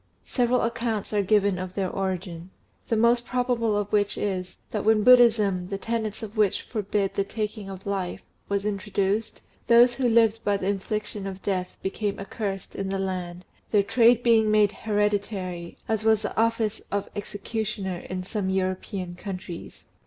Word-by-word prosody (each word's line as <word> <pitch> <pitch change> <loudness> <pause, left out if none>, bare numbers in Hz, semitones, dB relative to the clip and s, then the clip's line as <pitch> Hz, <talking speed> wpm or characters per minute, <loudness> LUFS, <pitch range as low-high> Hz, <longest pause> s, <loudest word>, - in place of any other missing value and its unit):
Several 250 0 +1
accounts 230 -3 -2
are 205 - +3
given 200 -1 +2
of 185 0 -6
their 190 -2 -1
origin; 185 -2 -3 0.4
the 225 - +1
most 235 +2 +4
probable 245 -3 0
of 205 0 -2
which 205 -1 +2
is, 185 -3 -3
that 210 - -2
when 220 -1 +4
Buddhism, 220 -7 +5
the 195 +1 -3
tenets 220 0 -3
of 215 +1 -7
which 210 -3 +2
forbid 205 -3 -1
the 200 - +1
taking 210 0 -4
of 190 0 -9
life, 195 -3 -3 0.3
was 200 0 0
introduced, 205 +1 -1 0.2
those 240 +1 +7
who 245 0 +1
lived 225 -1 +3
by 205 -1 +2
the 190 - -3
infliction 205 0 -3
of 190 0 -7
death 185 -2 -2
became 200 +1 -2
accursed 195 -1 -5
in 195 -1 -3
the 195 - -1
land, 185 -2 -4 0.2
their 205 -2 +4
trade 235 +3 +4
being 225 -2 +4
made 210 -1 +4
hereditary, 200 -5 -2
as 220 -1 0
was 220 -1 +3
the - - -3
office 225 -1 +1
of 200 -1 -1
executioner 205 -2 -3
in 185 0 -5
some 195 0 -2
European 185 -1 -2
countries. 180 -2 -8
205 Hz, 165 wpm, -26 LUFS, 190-220 Hz, 0.4 s, those